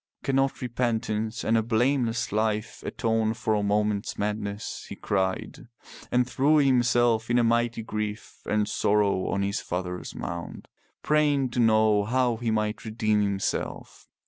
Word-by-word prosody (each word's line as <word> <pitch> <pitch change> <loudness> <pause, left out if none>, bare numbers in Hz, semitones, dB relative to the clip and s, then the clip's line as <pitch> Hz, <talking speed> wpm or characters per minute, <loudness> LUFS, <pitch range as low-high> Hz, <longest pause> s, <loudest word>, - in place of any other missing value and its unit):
Cannot 135 0 0
repentance 115 -2 -1
and 115 - +2
a 115 - +4
blameless 120 +1 0
life 110 0 -1
atone 110 -1 0
for 110 -1 -1
a 105 - +1
moment's 105 0 0
madness?'* 105 0 -4
he - - -6
cried, 95 +3 -2 0.4
and 125 0 +2
threw 140 +4 +3
himself 120 -4 +3
in 120 0 +3
mighty 115 0 +1
grief 105 0 -5
and 105 -1 +1
sorrow 100 -2 +1
on 100 - 0
his 100 +1 -1
father's 90 0 -5
mound, 85 0 -6 0.4
praying 145 -3 +2
to 125 - -2
know 110 -2 +4
how 120 +1 +1
he 120 0 -2
might 110 -1 -1
redeem 110 -1 0
himself. 100 -1 -3
110 Hz, 140 wpm, -26 LUFS, 105-120 Hz, 0.4 s, a